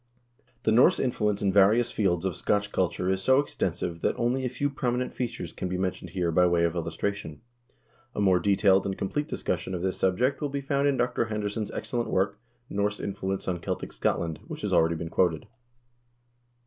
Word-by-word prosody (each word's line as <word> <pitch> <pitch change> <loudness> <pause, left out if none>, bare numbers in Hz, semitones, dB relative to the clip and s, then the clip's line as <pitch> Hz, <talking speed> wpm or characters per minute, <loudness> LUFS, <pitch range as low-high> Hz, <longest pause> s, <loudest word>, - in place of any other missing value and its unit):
2 - - -37 0.2
The 110 - +2
Norse 120 +4 +5
influence 105 -5 0
in 95 -1 +2
various 105 +5 +5
fields 95 -4 0
of 95 - -1
Scotch 105 0 0
culture 90 0 0
is 95 0 +1
so 130 +6 +4
ex 145 - -2
tensive 85 -1 -2
that - - 0
only 125 +2 0
a 125 - 0
few 130 +4 -1
prominent 125 -2 -2
features 125 -2 -4
can 90 - -4
be 90 - -2
mentioned 90 -1 -3
here 85 -1 -1
by 90 +2 +4
way 85 -1 +2
of 85 -1 +2
illustration. 85 0 -3 0.7
A - - -2
more 95 -3 +4
detailed 100 0 +3
and 95 - -3
complete 145 +10 -2
discussion 90 - -3
of 90 - -4
this 95 -1 -1
subject 125 +11 +1
will 145 - -1
be 140 +1 -2
found 140 +1 0
in 140 -2 +2
Dr. 120 +1 0
George - - -10
Henderson's 105 0 -2
excellent 120 -1 -3
work, 100 +2 0 0.3
"Norse 100 +1 -1
Influence 95 -1 -3
on 90 -2 -1
Celtic - - -4
Scotland," 80 -2 -1
which - - -7
has - - -2
already 80 +1 +4
been 80 0 -5
quoted. 80 -4 +1
100 Hz, 200 wpm, -27 LUFS, 90-120 Hz, 0.7 s, Norse